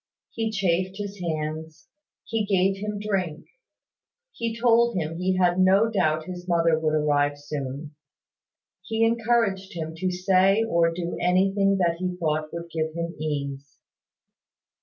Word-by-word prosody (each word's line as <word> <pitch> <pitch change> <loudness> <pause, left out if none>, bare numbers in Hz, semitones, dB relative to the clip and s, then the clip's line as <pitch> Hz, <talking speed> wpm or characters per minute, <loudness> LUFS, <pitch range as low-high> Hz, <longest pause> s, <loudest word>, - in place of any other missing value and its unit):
He 225 -1 -2
chafed 190 -2 0
his 205 -1 -6
hands, 155 -2 -4 0.4
he 225 -1 -1
gave 195 -1 +2
him 210 0 -3
drink; 190 -6 -2 0.9
he 230 - -4
told 235 -1 +4
him 165 0 -3
he 185 0 +1
had 180 0 +3
no 195 +4 +4
doubt 160 -6 +1
his 180 0 -8
mother 165 -2 +3
would 155 -1 +1
arrive 145 -1 +2
soon; 145 0 -6 0.9
he 225 0 0
encouraged 225 -4 +1
him 160 -1 -4
to 185 +2 -1
say 190 +3 +3
or 170 -6 +2
do 170 0 -4
anything 195 +2 +3
that 170 -3 +1
he 180 0 -2
thought 155 -2 -1
would 170 0 -7
give 160 0 -2
him 170 0 -3
ease. 140 -3 -4
180 Hz, 140 wpm, -25 LUFS, 160-195 Hz, 0.9 s, told